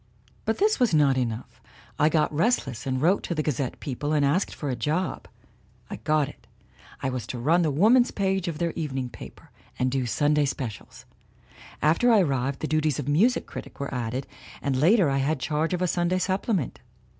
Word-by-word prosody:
"But 220 - 0
this 425 -2 +2
was 240 -10 +3
not 145 -3 +4
enough. 115 -3 -4 0.4
I 150 - +5
got 155 -1 +1
restless 145 - 0
and 130 -1 0
I - - -3
wrote 180 +6 +3
to 170 - -3
the 155 - 0
Gazette 135 -4 -2
people 145 +2 -3
and 145 -2 +3
asked 160 +8 0
for 145 -3 -3
a - - -1
job. 155 +10 -2 0.6
I - - -4
got 155 -2 +1
it 145 - -14 0.6
I 130 - +1
was 125 -4 -4
to 125 - -5
run 160 +9 +3
the 160 - +2
woman's 220 - +4
page 190 -2 -1
of 165 -3 -3
their 170 0 -1
evening 135 -6 -3
paper, - - -12 0.3
and 130 0 0
do 130 -2 -1
Sunday 145 +4 +2
specials. 125 -6 -6 0.8
After 170 +11 +4
I 215 -3 +6
arrived 135 -4 -1
the 155 - -1
duties 155 -3 +1
of 145 - -4
music 200 +13 +3
critic - - -9
were 140 0 -4
added, 125 +1 -3 0.3
and 140 -2 -1
later 175 - +4
I 135 -1 +1
had 140 +2 0
charge 155 +4 -1
of 180 0 -1
a - - +2
Sunday 175 +1 +1
supplement. 190 - -1
150 Hz, 200 wpm, -26 LUFS, 135-180 Hz, 0.8 s, I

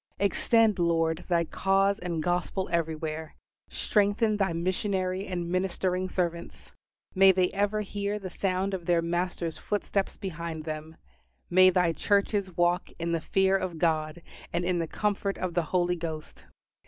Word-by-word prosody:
Extend, 215 +1 +3
Lord, 165 -1 +1
Thy 170 -2 +2
cause 195 +3 +1
and 170 -3 -3
Gospel 180 +2 -1
everywhere. 160 -1 -2 0.3
Strengthen 210 +1 +1
Thy 195 -3 +1
missionary 185 +2 -1
and 175 -2 -3
ministering 185 0 -1
servants. 170 -2 -3 0.4
May 195 0 +7
they 185 -1 +1
ever 205 +2 0
hear 205 0 -3
the 190 -3 -7
sound 190 +1 -1
of 175 -3 -4
their 170 -1 +3
Master's 175 -1 -2
footsteps 205 -1 -2
behind 170 -4 -5
them. 155 0 -6 0.6
May 185 +1 +7
thy 180 -2 +2
churches 200 -1 0
walk 175 +1 +2
in 170 0 -2
the 165 -1 0
fear 190 +3 +2
of 185 -3 -2
God 160 0 0 0.3
and 170 +1 -1
in 180 -1 +1
the 165 - -1
comfort 200 +1 -1
of 185 -2 -3
the 175 - +2
Holy 180 -1 +1
Ghost. 160 -2 -7
180 Hz, 150 wpm, -28 LUFS, 170-195 Hz, 0.6 s, May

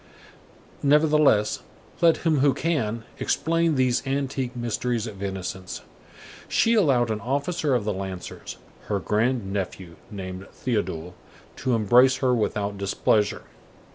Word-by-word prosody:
Nevertheless, 150 -7 +4 0.4
let 170 0 +4
him 155 -3 +3
who 140 0 +3
can 115 -9 -1 0.2
explain 165 -1 +1
these 130 -2 +2
antique 135 -2 -2
mysteries 120 -1 -2
of 100 -4 -8
innocence, 95 -1 -5 0.6
she 230 - +3
allowed 135 - +3
an 105 -1 -3
officer 140 - 0
of 115 -4 -1
the 105 - 0
Lancers, 95 -1 -6 0.3
her 105 - 0
grand 105 +2 0
nephew, 95 -3 -5
named 95 -2 -7 0.2
Théodule, 90 -8 -2 0.4
to 125 -2 0
embrace 125 +4 +5
her 130 -1 +1
without 105 -3 -1
displeasure. 100 +1 +1
120 Hz, 120 wpm, -25 LUFS, 100-140 Hz, 0.6 s, embrace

